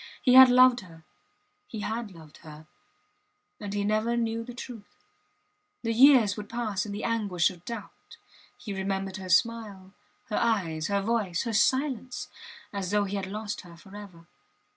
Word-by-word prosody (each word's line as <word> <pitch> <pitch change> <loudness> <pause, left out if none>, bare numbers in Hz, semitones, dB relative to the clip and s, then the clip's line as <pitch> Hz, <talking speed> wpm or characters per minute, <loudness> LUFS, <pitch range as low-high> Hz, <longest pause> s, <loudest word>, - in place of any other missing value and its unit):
He 250 - +3
had 260 0 +10
loved 250 0 +6
her 165 -4 -14 0.6
he 220 - -7
had 225 +1 -4
loved 160 -5 -15
her 155 0 -13 0.9
and 205 -2 -6
he 205 0 -2
never 215 +3 0
knew 230 -1 -1
the 245 +1 -10
truth... 235 -4 -11 0.8
The 230 -1 -1
years 240 -5 +6
would 210 0 -8
pass 220 -4 -3
in - - -6
the 205 +1 -5
anguish 205 -8 0
of 175 -2 -15
doubt... 230 -4 -9 0.4
He 205 - -7
remembered 195 0 -3
her 190 -1 -8
smile, 200 -1 0 0.4
her 210 - -1
eyes, 175 -9 0
her 200 -1 0
voice, 205 -6 -1
her 230 - -3
silence, 255 +2 0 0.4
as 195 -3 -3
though 205 +1 +2
he 200 0 -4
had 195 -1 -3
lost 210 +1 -5
her 170 -1 -15
forever. 190 -2 -13
205 Hz, 165 wpm, -27 LUFS, 190-230 Hz, 0.9 s, had